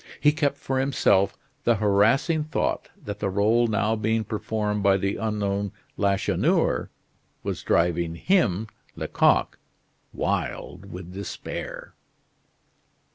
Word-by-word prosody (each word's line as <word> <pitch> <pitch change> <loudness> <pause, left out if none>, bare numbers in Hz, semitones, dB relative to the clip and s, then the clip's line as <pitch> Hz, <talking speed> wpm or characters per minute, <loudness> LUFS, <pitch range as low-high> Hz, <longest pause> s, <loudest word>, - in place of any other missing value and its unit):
He 150 - +5
kept 145 -2 0
for 135 -2 -2
himself 125 -7 +2 0.3
the 120 - +4
harassing 110 - +3
thought 155 - -1 0.2
that 105 0 -5
the 100 - -1
role 110 +5 +3
now 110 0 +1
being 110 +1 0
performed 105 0 -2
by 100 -1 +4
the 100 +1 -1
unknown 100 -2 -1 0.2
Lacheneur 100 -1 +1 0.5
was - - -3
driving 85 -1 +1
him 110 - +2 0.3
Lecoq - - +2 0.5
wild - - -3
with 90 0 -8
despair. 100 +1 -6
105 Hz, 110 wpm, -25 LUFS, 100-115 Hz, 0.5 s, He